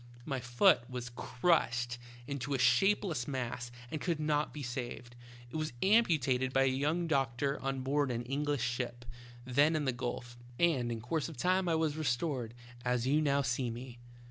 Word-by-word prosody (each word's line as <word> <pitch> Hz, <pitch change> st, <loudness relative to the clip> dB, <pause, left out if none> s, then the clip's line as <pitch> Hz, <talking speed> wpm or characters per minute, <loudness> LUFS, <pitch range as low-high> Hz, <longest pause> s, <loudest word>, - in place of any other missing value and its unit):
My 135 Hz, -3 st, -2 dB
foot 120 Hz, 0 st, +3 dB
was 125 Hz, -1 st, -5 dB
crushed 125 Hz, -2 st, +1 dB, 0.3 s
into 140 Hz, +1 st, -3 dB
a -, -, +1 dB
shapeless 140 Hz, +3 st, +3 dB
mass 125 Hz, -3 st, -3 dB, 0.2 s
and 155 Hz, -, -3 dB
could 170 Hz, -3 st, -1 dB
not 150 Hz, -1 st, +1 dB
be 150 Hz, -, -6 dB
saved; 120 Hz, -1 st, -5 dB, 0.4 s
it -, -, -3 dB
was 155 Hz, -4 st, -2 dB
amputated 155 Hz, -, +3 dB
by 135 Hz, 0 st, +4 dB
a 130 Hz, -1 st, +2 dB
young 150 Hz, +6 st, 0 dB
doctor 140 Hz, -2 st, 0 dB
on 135 Hz, -1 st, -2 dB
board 140 Hz, +1 st, +1 dB
an 120 Hz, -1 st, -2 dB
English 140 Hz, +1 st, -1 dB
ship, 125 Hz, -1 st, -3 dB, 0.4 s
then 145 Hz, +5 st, +3 dB
in 150 Hz, -2 st, 0 dB
the 130 Hz, -, +2 dB
gulf, 120 Hz, -1 st, -5 dB, 0.2 s
and 140 Hz, -9 st, +2 dB
in 115 Hz, -1 st, -4 dB
course 155 Hz, +7 st, -1 dB
of 160 Hz, -, -10 dB
time 185 Hz, +4 st, +2 dB
I 165 Hz, -, +3 dB
was 160 Hz, -2 st, 0 dB
restored, 125 Hz, -4 st, -1 dB, 0.3 s
as 125 Hz, -1 st, 0 dB
you 145 Hz, +4 st, +3 dB
now 140 Hz, -2 st, +2 dB
see 120 Hz, 0 st, 0 dB
me." 120 Hz, +1 st, -8 dB
135 Hz, 175 wpm, -33 LUFS, 120-150 Hz, 0.4 s, by